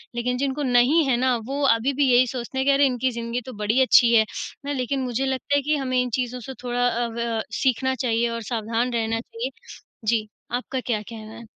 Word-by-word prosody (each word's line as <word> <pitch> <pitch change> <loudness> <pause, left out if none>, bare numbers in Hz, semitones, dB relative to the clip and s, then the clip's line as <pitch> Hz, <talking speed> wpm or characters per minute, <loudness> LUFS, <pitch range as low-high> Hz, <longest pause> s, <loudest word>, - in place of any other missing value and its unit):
लेकिन 250 +1 -1
जिनको 280 +2 -1
नहीं 255 +5 +4
है 245 - +3
ना 255 0 +2
वो 280 +2 -3
अभी 235 +3 +2
भी 275 -1 +2
यही 250 +1 +5
सोचते 245 +2 -5
हैं 265 - +1
कि 280 - +6
अरे! 280 +1 +4
इनकी 255 0 0
ज़िंदगी 235 +1 -3
तो 255 - -8
बड़ी 225 +6 +3
अच्छी 240 -2 +6
है। 220 -1 +5 0.5
लेकिन 265 +1 -1
मुझे 255 +1 -1
लगता 265 +2 -1
है 285 - +3
कि 300 +2 +1
हमें 255 -2 0
इन 250 - -2
चीज़ों 250 0 -2
से 255 +3 -8
थोड़ा 245 0 +1
अ, 240 0 0
व 230 -1 -2 0.2
सीखना 260 0 +1
चाहिए 235 -2 0
और 230 0 -4
सावधान 230 +2 -1
रहना 225 -1 0
चाहिए। 230 +2 -5 0.6
जी, 215 -1 +1 0.3
आपका 255 +2 -2
क्या 235 -4 -2
कहना 220 0 -10
है? 230 - -10
245 Hz, 220 wpm, -24 LUFS, 230-260 Hz, 0.6 s, कि